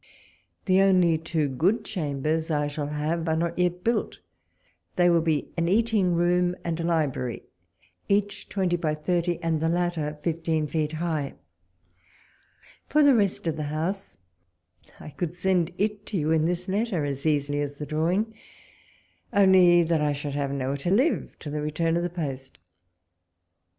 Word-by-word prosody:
The 190 Hz, 0 st, +4 dB
only 180 Hz, -4 st, +4 dB
two 160 Hz, -2 st, -1 dB
good 170 Hz, -, +1 dB
chambers 155 Hz, -2 st, -2 dB
I 150 Hz, -2 st, +1 dB
shall 145 Hz, 0 st, -3 dB
have 155 Hz, +3 st, -2 dB
are 160 Hz, -, +2 dB
not 170 Hz, +2 st, -2 dB
yet 180 Hz, 0 st, 0 dB
built: 235 Hz, +1 st, 0 dB, 0.8 s
they 175 Hz, -1 st, +4 dB
will 170 Hz, -1 st, +4 dB
be 160 Hz, -3 st, -1 dB
an 170 Hz, 0 st, 0 dB
eating 205 Hz, -3 st, +2 dB
room 175 Hz, +1 st, +2 dB
and 170 Hz, -1 st, -2 dB
a -, -, -2 dB
library, 150 Hz, -8 st, -1 dB, 0.7 s
each 205 Hz, 0 st, 0 dB
twenty 185 Hz, -3 st, 0 dB
by 155 Hz, -3 st, -1 dB
thirty, 175 Hz, +2 st, 0 dB
and 160 Hz, -2 st, 0 dB
the 160 Hz, -, +1 dB
latter 170 Hz, -3 st, -1 dB
fifteen 160 Hz, -2 st, 0 dB
feet 155 Hz, 0 st, -2 dB
high. 155 Hz, -3 st, -2 dB, 1.5 s
For 300 Hz, +1 st, +3 dB
the 285 Hz, -1 st, +6 dB
rest 205 Hz, -7 st, +1 dB
of 160 Hz, -2 st, -1 dB
the 150 Hz, -, -3 dB
house, 175 Hz, +6 st, -3 dB, 0.8 s
I -, -, -9 dB
could 170 Hz, +3 st, -4 dB
send 180 Hz, -2 st, +1 dB
it 210 Hz, +1 st, -2 dB
to 205 Hz, -, -2 dB
you 155 Hz, -1 st, 0 dB
in 160 Hz, -1 st, +3 dB
this 180 Hz, +1 st, -2 dB
letter 195 Hz, -5 st, 0 dB
as 140 Hz, +1 st, -3 dB
easily 145 Hz, -1 st, +1 dB
as 145 Hz, 0 st, -4 dB
the 150 Hz, -, -5 dB
drawing, 175 Hz, +9 st, 0 dB, 1.0 s
only 190 Hz, -4 st, +6 dB
that 165 Hz, -1 st, +1 dB
I 150 Hz, -1 st, +1 dB
should 145 Hz, 0 st, -5 dB
have 140 Hz, -1 st, -2 dB
nowhere 140 Hz, 0 st, -2 dB
to 155 Hz, +5 st, -3 dB
live 255 Hz, -, +1 dB
till 150 Hz, -, -7 dB
the 150 Hz, 0 st, -2 dB
return 165 Hz, +2 st, 0 dB
of 170 Hz, -, +1 dB
the 175 Hz, -, -1 dB
post. 135 Hz, -6 st, -5 dB
165 Hz, 165 wpm, -26 LUFS, 150-180 Hz, 1.5 s, the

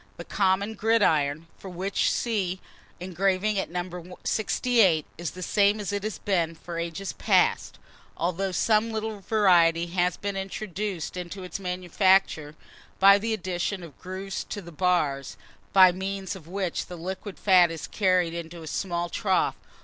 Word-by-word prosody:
The -, -, -8 dB
common 200 Hz, +2 st, +1 dB
gridiron, 165 Hz, -9 st, +2 dB
for 195 Hz, -, -9 dB
which 185 Hz, +2 st, 0 dB
see 195 Hz, -6 st, -1 dB, 0.4 s
engraving 190 Hz, +3 st, 0 dB
at -, -, -3 dB
No. 180 Hz, 0 st, -6 dB
68, 220 Hz, -, +2 dB
is 170 Hz, -1 st, -4 dB
the 185 Hz, -, -8 dB
same 205 Hz, +3 st, +3 dB
as 205 Hz, -1 st, -3 dB
it 205 Hz, -, -1 dB
has 210 Hz, -4 st, -4 dB
been 170 Hz, -2 st, 0 dB
for 170 Hz, +1 st, -7 dB
ages 170 Hz, +3 st, -4 dB
past, -, -, +1 dB, 0.4 s
although 185 Hz, +3 st, -1 dB
some 215 Hz, +4 st, +2 dB
little 220 Hz, -1 st, -4 dB
variety 175 Hz, -5 st, +3 dB
has 180 Hz, +1 st, 0 dB
been 200 Hz, -1 st, -4 dB
introduced 195 Hz, -2 st, -4 dB
into 180 Hz, +2 st, -6 dB
its 180 Hz, -, -6 dB
manufacture, 180 Hz, -3 st, +1 dB, 0.4 s
by 200 Hz, +1 st, +7 dB
the 225 Hz, +2 st, -2 dB
addition 185 Hz, 0 st, -3 dB
of 165 Hz, -4 st, -12 dB
grooves 190 Hz, +1 st, -5 dB
to 205 Hz, -, -5 dB
the 175 Hz, -3 st, -10 dB
bars, 150 Hz, -6 st, 0 dB, 0.3 s
by 185 Hz, -2 st, +8 dB
means 190 Hz, +1 st, -4 dB
of 170 Hz, -5 st, -12 dB
which 185 Hz, -1 st, -3 dB
the 180 Hz, -, -8 dB
liquid 190 Hz, +3 st, -6 dB
fat 180 Hz, -3 st, +5 dB
is 165 Hz, -2 st, -6 dB
carried 185 Hz, -4 st, +1 dB
into 170 Hz, 0 st, -7 dB
a -, -, -9 dB
small 175 Hz, +1 st, -2 dB
trough. 190 Hz, +2 st, +1 dB
185 Hz, 155 wpm, -26 LUFS, 175-200 Hz, 0.4 s, by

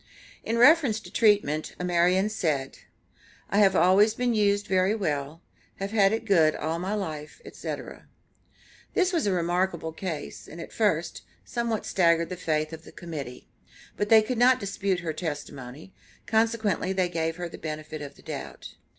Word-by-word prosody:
In 230 Hz, -, -1 dB
reference 265 Hz, -3 st, +5 dB
to -, -, -12 dB
treatment, 200 Hz, -9 st, +2 dB
Amarian 180 Hz, +2 st, +2 dB
said: 155 Hz, -11 st, -2 dB, 0.7 s
"I 200 Hz, -, +3 dB
have 195 Hz, -2 st, +5 dB
always 205 Hz, +5 st, +5 dB
been 245 Hz, -1 st, 0 dB
used 205 Hz, -1 st, +2 dB
very 190 Hz, +1 st, +2 dB
well; 155 Hz, -5 st, -3 dB, 0.3 s
have 195 Hz, +1 st, -5 dB
had 200 Hz, -3 st, +4 dB
it 225 Hz, +1 st, -2 dB
good 165 Hz, -7 st, +4 dB
all 160 Hz, +2 st, -2 dB
my 190 Hz, +4 st, -2 dB
life, 155 Hz, -7 st, -5 dB
etc." -, -, -7 dB, 0.9 s
This 370 Hz, -1 st, +2 dB
was 325 Hz, -10 st, +1 dB
a -, -, +2 dB
remarkable 175 Hz, -1 st, 0 dB
case, 160 Hz, -4 st, -6 dB
and, 165 Hz, -, -10 dB
at -, -, -9 dB
first, 175 Hz, -7 st, 0 dB, 0.2 s
somewhat 235 Hz, -3 st, -2 dB
staggered 170 Hz, -2 st, +2 dB
the 180 Hz, -, -4 dB
faith 155 Hz, -2 st, -1 dB
of 160 Hz, 0 st, -9 dB
the -, -, -13 dB
Committee, 145 Hz, -8 st, -8 dB, 0.5 s
but 205 Hz, -, -2 dB
they 220 Hz, -1 st, +7 dB
could 230 Hz, +2 st, -3 dB
not 255 Hz, +1 st, +5 dB
dispute 195 Hz, -2 st, -2 dB
her 165 Hz, -2 st, -3 dB
testimony, 145 Hz, -1 st, -7 dB, 0.3 s
consequently 220 Hz, -4 st, +1 dB
they 185 Hz, -1 st, +1 dB
gave 165 Hz, -2 st, -2 dB
her 175 Hz, 0 st, -4 dB
the -, -, -10 dB
benefit 155 Hz, -1 st, -6 dB
of 145 Hz, -1 st, -8 dB
the -, -, -19 dB
doubt. -, -, -7 dB
185 Hz, 165 wpm, -26 LUFS, 160-210 Hz, 0.9 s, they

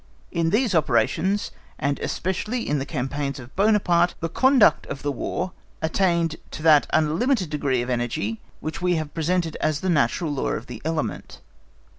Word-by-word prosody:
In 165 Hz, -2 st, +1 dB
these 220 Hz, +3 st, +2 dB
operations, 190 Hz, +4 st, +1 dB, 0.3 s
and 140 Hz, +1 st, -1 dB
especially 210 Hz, +7 st, -2 dB
in 145 Hz, 0 st, +1 dB
the 135 Hz, -, -4 dB
campaigns 140 Hz, 0 st, -3 dB
of 120 Hz, 0 st, -12 dB
Buonaparte, 190 Hz, -4 st, +3 dB
the 165 Hz, -, -2 dB
conduct 260 Hz, +4 st, +4 dB
of 140 Hz, 0 st, -7 dB
War 160 Hz, +6 st, -2 dB, 0.3 s
attained 165 Hz, -1 st, +1 dB
to 155 Hz, -, -8 dB
that 155 Hz, -3 st, +6 dB
unlimited 170 Hz, -, +1 dB
degree 135 Hz, -5 st, 0 dB
of 120 Hz, -, -6 dB
energy 115 Hz, -3 st, -2 dB, 0.2 s
which 155 Hz, +4 st, -5 dB
we 180 Hz, -1 st, +2 dB
have 155 Hz, -2 st, -2 dB
represented 165 Hz, +1 st, -1 dB
as 155 Hz, -1 st, 0 dB
the 185 Hz, -, -1 dB
natural 150 Hz, +2 st, +1 dB
law 135 Hz, -, -1 dB
of -, -, -4 dB
the 120 Hz, -3 st, -9 dB
element. 160 Hz, 0 st, -3 dB
160 Hz, 160 wpm, -24 LUFS, 145-185 Hz, 0.3 s, that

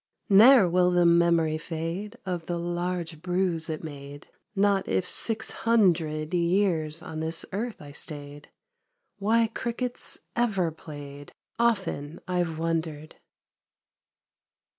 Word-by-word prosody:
Ne'er 215 Hz, +1 st, +8 dB
will 180 Hz, +1 st, +3 dB
the 175 Hz, -1 st, +3 dB
memory 170 Hz, -2 st, +3 dB
fade 170 Hz, +7 st, -5 dB
Of 175 Hz, -3 st, -4 dB
the 175 Hz, -, -2 dB
large 175 Hz, -2 st, -3 dB
bruise 180 Hz, -2 st, -1 dB
it 155 Hz, 0 st, -4 dB
made, 145 Hz, -2 st, -9 dB, 0.3 s
Not 200 Hz, -1 st, +2 dB
if 185 Hz, -, 0 dB
six 220 Hz, -1 st, +2 dB
hundred 170 Hz, -9 st, +1 dB
Years 170 Hz, -3 st, +1 dB
on 155 Hz, -, -6 dB
this 160 Hz, +1 st, -2 dB
earth 220 Hz, +4 st, -4 dB
I 145 Hz, -2 st, -11 dB
stayed. 145 Hz, -1 st, -8 dB, 0.7 s
Why 225 Hz, +3 st, +3 dB
cricket's 235 Hz, +2 st, -4 dB, 0.2 s
ever 195 Hz, -8 st, +1 dB
played. 145 Hz, -2 st, -10 dB, 0.3 s
Often 190 Hz, -10 st, 0 dB
I've 175 Hz, -3 st, -1 dB
wondered 160 Hz, -2 st, -3 dB
170 Hz, 115 wpm, -27 LUFS, 155-195 Hz, 0.7 s, Ne'er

